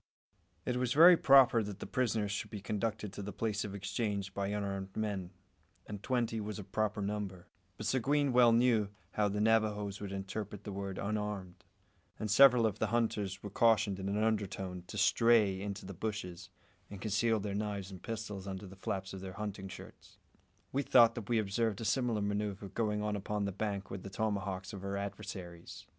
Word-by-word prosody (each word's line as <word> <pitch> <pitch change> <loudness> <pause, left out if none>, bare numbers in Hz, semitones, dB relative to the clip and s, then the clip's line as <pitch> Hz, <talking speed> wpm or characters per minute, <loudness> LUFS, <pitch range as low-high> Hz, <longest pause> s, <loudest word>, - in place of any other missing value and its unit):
It 125 - 0
was 125 -1 0
very 170 +4 +9
proper 135 -6 +6
that 100 -2 -5
the - - -7
prisoners 110 -5 0
should 100 - -3
be 105 - -6
conducted 105 0 -3
to - - -6
the 100 +1 -5
place 110 -1 -1
of 100 -1 -5
exchange 100 0 -2
by 100 0 -2
unarmed 100 -2 -3
men, 100 -5 -2 0.6
and 105 -2 -7
twenty 120 -3 0
was 105 -1 -5
a 105 - -6
proper 105 +1 -1
number; 100 -3 -4 0.3
but 110 - -6
Seguin 135 +3 +2
well 120 -1 +7
knew 115 -3 +3 0.2
how 105 -1 +1
the 105 +1 -2
Navajoes 105 -2 +1
would 100 -1 -5
interpret 100 +1 -5
the 105 - -6
word 100 -1 -4
"unarmed"; 105 -3 -3 0.5
and 110 -2 -3
several 125 0 +7
of 110 -4 -1
the - - +1
hunters 105 -4 -1
were 105 - -6
cautioned 110 -3 +3
in 95 0 -3
an 105 +2 0
undertone 95 -4 -2
to 105 - -7
"stray" 105 -2 +4
into 100 0 -5
the 100 - -7
bushes, 95 -3 -5 0.4
and 100 - -8
conceal 110 +2 +1
their 100 0 -3
knives 100 -2 -3
and 95 - -9
pistols 110 -4 -5
under 95 0 -5
the 95 0 -11
flaps 95 0 -4
of 95 - -7
their 95 -1 -7
hunting 100 -1 -5
shirts. 95 - -12 0.5
We 140 - +1
thought 120 -4 +6
that 115 -3 -7
we 120 - +3
observed 110 0 0
a 115 - -4
similar 120 -4 +1
manoeuvre 100 -1 -2
going 105 -1 -1
on 105 0 -1
upon 105 +1 -2
the 100 - -1
opposite 95 - -16
bank 100 -3 -2
with 95 - -5
the 100 - -7
tomahawks 100 -2 -2
of 100 -1 -7
our 100 0 -2
adversaries. 95 -4 -7
105 Hz, 195 wpm, -33 LUFS, 100-110 Hz, 0.6 s, very